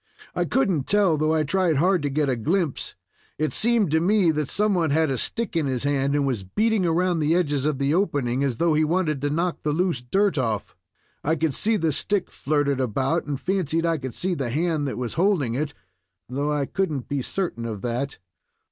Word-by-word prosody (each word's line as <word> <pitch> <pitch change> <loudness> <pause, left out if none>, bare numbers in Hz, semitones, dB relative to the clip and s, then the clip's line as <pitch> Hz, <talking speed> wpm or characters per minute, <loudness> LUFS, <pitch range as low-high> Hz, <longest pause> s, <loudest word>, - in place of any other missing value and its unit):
"I - - 0
couldn't 185 - +1
tell, 200 -5 +3
though 155 +1 +1
I 155 - +2
tried 175 +1 +1
hard 180 +4 +3
to 145 - -1
get 145 +1 0
a 130 - +1
glimpse. 160 - -1 0.4
It 155 +1 -1
seemed 225 -6 +2
to 160 - +3
me 185 0 +3
that 150 -2 -2
some 210 0 +2
one 170 -4 +1
had 155 0 +2
a 130 - -1
stick 230 -6 -2
in 160 -4 +1
his 130 -2 -2
hand, 140 0 +1
and 145 -1 +1
was 125 -8 -1
beating 215 - +1
around 175 +1 +1
the 155 +2 +2
edges 145 -6 0
of 150 -2 0
the 140 +2 +1
opening, 140 -9 0
as 130 -5 -1
though 170 -1 +2
he 155 +1 +3
wanted 155 -3 0
to 145 - 0
knock 170 +4 -1
the 150 - -1
loose 170 -5 0
dirt 195 +7 +1
off. 110 -5 -2 0.5
I 160 +3 +1
could 160 -2 0
see 220 +7 +2
the 165 -3 +1
stick 200 +6 0
flirted 140 -2 0
about, 130 +7 0
and 140 -3 -3
fancied 170 -4 0
I 165 -2 +1
could 130 -3 -6
see 185 0 -1
the 135 -7 -2
hand 155 +2 0
that 135 - -4
was 125 -2 -3
holding 170 - +1
it, 140 0 -3 0.5
though 140 +4 -2
I 145 -2 0
could 190 +4 -1
n't 135 -5 -4
be 140 -1 -2
certain 130 -6 -3
of 110 -4 -5
that." 125 +4 -2
155 Hz, 220 wpm, -24 LUFS, 140-180 Hz, 0.5 s, tell